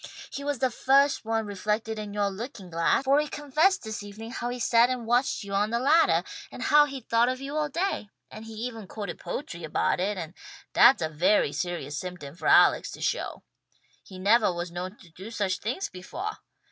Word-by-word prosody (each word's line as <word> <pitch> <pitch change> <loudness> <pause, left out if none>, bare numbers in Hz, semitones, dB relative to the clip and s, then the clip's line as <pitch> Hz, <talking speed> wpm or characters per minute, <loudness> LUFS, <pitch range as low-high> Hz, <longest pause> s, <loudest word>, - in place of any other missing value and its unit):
He 280 - -5
was 290 -1 -1
the 255 +1 +1
first 275 +3 +3
one 225 0 0
reflected 210 +2 -2
in 210 -1 -6
yoah 205 -1 0
looking 200 -2 -8
glass, 165 +9 +2
for 275 +1 +4
he 300 - 0
confessed 305 +7 +1
this 220 -2 -5
evening 210 +3 -9
how 240 -1 -3
he 245 - -4
sat 235 0 +4
and 250 -2 -3
watched 240 +1 +1
you 200 0 -7
on 205 +2 +2
the 235 - 0
laddah, 295 +7 +4 0.3
and - - -6
how 295 0 +6
he'd 270 -4 -8
thought 230 +1 +3
of 255 0 -2
you 275 +2 -6
all 305 -1 0
day; 335 - -2 0.2
and 215 +1 -9
he 225 - -9
even 225 -2 -6
quoted 200 -3 -6
poetry 175 - -6
about 150 - 0
it, 200 +2 -1
and 165 -2 -6 0.4
that's 240 -7 +6
a - - +1
very 155 0 +2
serious 165 -5 -3
symptom 180 -6 -7
for 170 - -5
Alex - - +5
to - - -9
show. - - -2 0.6
He 190 - -12
nevah 210 +3 +4
was 175 0 -5
known 185 +3 -6
to 170 - -18
do 190 +6 -10
such 200 -5 -1
things 255 - -3
befoah! 350 - -6
220 Hz, 210 wpm, -27 LUFS, 185-260 Hz, 0.6 s, how